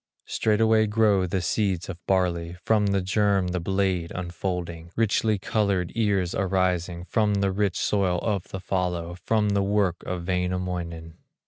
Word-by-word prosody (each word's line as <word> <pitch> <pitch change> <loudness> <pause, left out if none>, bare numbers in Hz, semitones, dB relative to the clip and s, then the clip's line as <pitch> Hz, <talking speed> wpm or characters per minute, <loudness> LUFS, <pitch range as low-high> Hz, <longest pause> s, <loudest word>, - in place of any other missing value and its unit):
Straightway 110 0 +2
grow 105 -3 +3
the 90 +1 -1
seeds 95 -1 0
of 85 -2 -8
barley, 90 -2 0
From 105 -2 +3
the 100 -1 +1
germ 100 -1 +2
the 90 0 -1
blade 95 -1 0
unfolding, 85 -2 -4
Richly 110 -1 +2
colored 95 -3 0
ears 100 -6 +1
arising, 90 -2 0
From 105 0 +1
the 100 -1 +1
rich 100 -1 0
soil 95 -4 +1
of 100 -5 -1
the 95 - -6
fallow, 90 -2 -2
From 110 -2 +2
the 100 0 +2
work 100 -3 +1
of 90 -1 -3
Wainamoinen. 90 -3 -3
95 Hz, 145 wpm, -25 LUFS, 90-100 Hz, -, grow